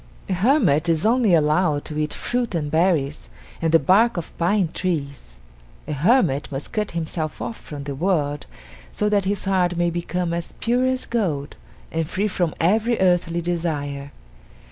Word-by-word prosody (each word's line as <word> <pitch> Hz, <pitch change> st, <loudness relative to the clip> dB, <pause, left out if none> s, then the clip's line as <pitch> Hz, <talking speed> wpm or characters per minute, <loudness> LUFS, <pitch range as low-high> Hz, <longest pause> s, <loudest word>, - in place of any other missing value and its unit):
A -, -, +1 dB
hermit 180 Hz, -, +3 dB
is 165 Hz, +3 st, +1 dB
only 225 Hz, -5 st, +4 dB
allowed 150 Hz, -1 st, +2 dB
to 150 Hz, -, -6 dB
eat 150 Hz, 0 st, -1 dB
fruit 240 Hz, -5 st, -2 dB
and 150 Hz, -3 st, -2 dB
berries 160 Hz, -4 st, +1 dB, 0.3 s
and 165 Hz, -1 st, +1 dB
the 165 Hz, -, +7 dB
bark 195 Hz, -, +3 dB
of 170 Hz, -, -6 dB
pine 185 Hz, +2 st, +2 dB
trees; 140 Hz, -, -4 dB, 0.5 s
a -, -, -2 dB
hermit 150 Hz, -, +2 dB
must 135 Hz, +1 st, -5 dB
cut 210 Hz, -1 st, -1 dB
himself 160 Hz, -1 st, -3 dB
off 230 Hz, -, -4 dB
from 145 Hz, -8 st, -9 dB
the 140 Hz, 0 st, -4 dB
world 150 Hz, -2 st, -1 dB, 0.4 s
so 210 Hz, -, 0 dB
that 205 Hz, -2 st, +2 dB
his 200 Hz, +1 st, -1 dB
heart 180 Hz, -2 st, +1 dB
may 175 Hz, 0 st, +1 dB
become 175 Hz, 0 st, -2 dB
as 170 Hz, 0 st, -4 dB
pure 245 Hz, +2 st, +1 dB
as 260 Hz, 0 st, -1 dB
gold 170 Hz, -12 st, -2 dB, 0.4 s
and 165 Hz, -1 st, -1 dB
free 200 Hz, +6 st, -1 dB
from 180 Hz, -5 st, -1 dB
every 220 Hz, +7 st, +2 dB
earthly 175 Hz, -2 st, +2 dB
desire. 150 Hz, -5 st, -3 dB
170 Hz, 165 wpm, -22 LUFS, 150-200 Hz, 0.5 s, the